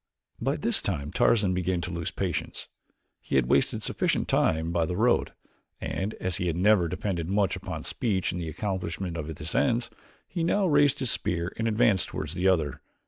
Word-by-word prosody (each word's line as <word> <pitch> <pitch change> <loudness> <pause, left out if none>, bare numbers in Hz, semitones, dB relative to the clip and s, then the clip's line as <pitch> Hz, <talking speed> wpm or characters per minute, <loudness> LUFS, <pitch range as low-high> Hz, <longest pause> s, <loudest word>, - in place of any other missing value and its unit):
By - - +1
this - - +2
time 70 +1 -3
Tarzan 100 -5 +3
began 90 0 0
to 85 +1 -4
lose 85 -2 -3
patience. - - -3 0.5
He - - -4
had 65 -2 +4
wasted - - +2
sufficient - - 0
time 80 +1 +1
by 85 -2 +1
the 90 - -3
road, 120 +3 +2 0.5
and 100 +4 -3
as 90 -2 -2
he 90 - -1
had 85 -1 -1
never 95 -2 +4
depended 85 -1 -3
much 100 -2 +2
upon - - -6
speech 100 -6 -1
in 90 - -4
the 85 -2 -4
accomplishment 90 -1 -3
of 80 -3 -4
his 80 0 -6
ends, 120 -2 +1 0.4
he 170 -2 -3
now 195 +4 +2
raised 145 -4 +4
his 130 -4 +1
spear 85 +1 0
and 115 - -1
advanced 110 -3 +3
toward 75 - -5
the 90 +4 0
other. 80 -7 +1
90 Hz, 190 wpm, -27 LUFS, 85-110 Hz, 0.5 s, had